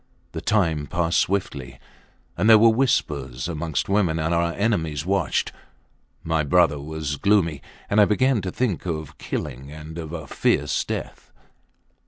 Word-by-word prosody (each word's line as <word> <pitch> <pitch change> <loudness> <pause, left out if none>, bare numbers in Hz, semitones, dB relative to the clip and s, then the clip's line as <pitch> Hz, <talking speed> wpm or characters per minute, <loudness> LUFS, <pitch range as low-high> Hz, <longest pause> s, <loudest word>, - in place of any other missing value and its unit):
The - - -5
time 80 -9 +1
passed 85 +1 +1
swiftly... 70 -10 -2 0.6
and 110 - +2
there 110 - +9
were 115 +1 +6
whispers 70 - 0
amongst 80 -4 -2
women 95 -5 +1
and 80 +1 0
our 85 0 +1
enemies 80 -9 -1
watched 100 +1 0 0.7
my 80 -1 0
brother 75 -1 +3
was 75 0 -4
gloomy, 85 -6 +2 0.3
and 105 +1 +4
I - - +7
began 130 +2 +2
to 90 -1 -4
think 105 -7 -2
of 80 -3 -5
killing 70 -1 -5
and 80 +2 -9
of 80 -2 -6
a 80 -2 -6
fierce - - 0
death. - - -6
85 Hz, 150 wpm, -23 LUFS, 75-100 Hz, 0.7 s, there